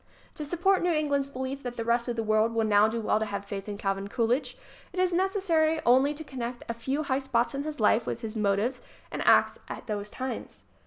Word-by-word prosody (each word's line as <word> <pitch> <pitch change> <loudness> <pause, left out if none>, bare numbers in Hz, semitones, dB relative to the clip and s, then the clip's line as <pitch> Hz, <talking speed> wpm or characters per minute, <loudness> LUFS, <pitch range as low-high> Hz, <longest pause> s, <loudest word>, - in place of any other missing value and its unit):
To 305 - -6
support 350 +6 +2
New 355 - +1
England's 285 -3 0
belief 265 +1 -4
that 245 -2 -6
the 230 - -3
rest 235 +1 +1
of 240 - -1
the 225 - -1
world 215 +1 +2
will 225 -1 +2
now 210 0 +5
do 225 +1 -2
well 215 - +2
to 220 - 0
have 200 -1 -4
faith 200 0 -6
in 205 - -4
Calvin 195 0 -2
Coolidge 245 +4 0 0.4
it 365 - -4
is 365 -1 +2
necessary 345 -4 +2
only 265 +4 +4
to 315 - -7
connect 250 -4 -5
a 235 - -2
few 265 +6 -2
high 265 -2 0
spots 250 -3 0
in 275 - -2
his 300 -1 -5
life 220 +1 +3
with 235 - -3
his 225 -1 -5
motives 215 +4 0 0.3
and - - -3
acts - - +5
at - - -7
those 210 -2 -4
times. 260 +3 -6
245 Hz, 230 wpm, -28 LUFS, 220-285 Hz, 0.4 s, now